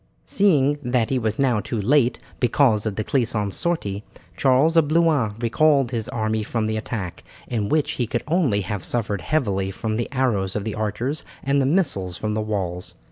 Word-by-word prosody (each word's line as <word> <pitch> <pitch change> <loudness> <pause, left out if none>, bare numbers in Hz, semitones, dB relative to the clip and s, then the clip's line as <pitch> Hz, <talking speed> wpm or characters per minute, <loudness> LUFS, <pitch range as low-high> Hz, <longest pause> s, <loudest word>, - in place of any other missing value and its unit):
Seeing 145 - +2
that 125 -3 0
he 130 - +2
was 110 -2 -1
now 125 -5 +2
too 115 +2 -3
late, 125 +4 +2 0.2
because 120 -4 +3
of 105 - -3
De 110 - -2
Clisson's 110 -6 0
sortie, 105 - -2 0.3
Charles 135 - +3
of 165 -3 +5
Blois 155 -9 +2
recalled 135 +2 +3
his 115 -3 -3
army 110 -3 -1
from 110 +1 -2
the 110 0 -1
attack, 110 -4 -5 0.2
in 110 -4 -2
which 155 -1 +1
he 120 - -2
could 120 - -2
only 150 - +2
have 100 -1 -4
suffered 105 -5 -2
heavily 100 -11 0
from 110 +3 -3
the 120 - -2
arrows 115 -8 0
of 105 - -1
the 110 0 -3
archers 110 +7 -2 0.2
and 140 +1 +2
the 130 - +1
missiles 135 - +1
from 105 +2 -2
the 110 - -1
walls. 95 -4 -3
115 Hz, 190 wpm, -23 LUFS, 105-140 Hz, 0.3 s, of